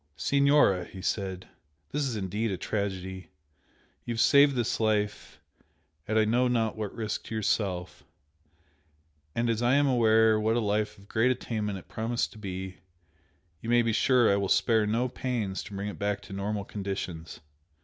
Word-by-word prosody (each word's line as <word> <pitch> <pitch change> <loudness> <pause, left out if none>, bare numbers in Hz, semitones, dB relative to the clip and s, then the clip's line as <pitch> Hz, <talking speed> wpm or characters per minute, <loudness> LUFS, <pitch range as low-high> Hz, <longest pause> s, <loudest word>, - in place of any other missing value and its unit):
"Signora," 140 -10 +3
he 95 - -11
said 95 -1 -3 0.4
"This 145 -1 0
is 125 - -3
indeed 105 +3 -2
a 95 - -2
tragedy! 95 -3 -4 0.7
You 120 - -3
have - - -4
saved 140 +3 +6
this 120 -2 -1
life 105 -2 -1 0.7
at 110 - 0
I 110 - +4
know 120 +4 +2
not 115 -3 0
what 105 -2 -5
risk 110 -2 -3
to 110 - -6
yourself 95 -4 -1 1.3
and 120 0 +1
as 115 -1 0
I 120 +2 +3
am 145 0 +4
aware 110 -4 +4
what 110 +1 +1
a - - +2
life 105 0 -1
of 100 0 -18
great 115 +4 +2
attainment 110 -5 -2
it 90 - -12
promised 115 +2 -2
to 110 - -13
be, 95 -2 -6 0.8
you 115 - -6
may 120 0 +4
be 115 -1 0
sure 125 0 +4
I - - +2
will 100 -1 -1
spare 110 -3 +3
no 115 +4 +1
pains 115 -7 -3
to 100 - -9
bring 100 +1 -3
it 105 - -6
back 100 0 -1
to 100 - -10
normal 100 +1 -3
conditions. 95 -5 -5
110 Hz, 175 wpm, -28 LUFS, 100-120 Hz, 1.3 s, saved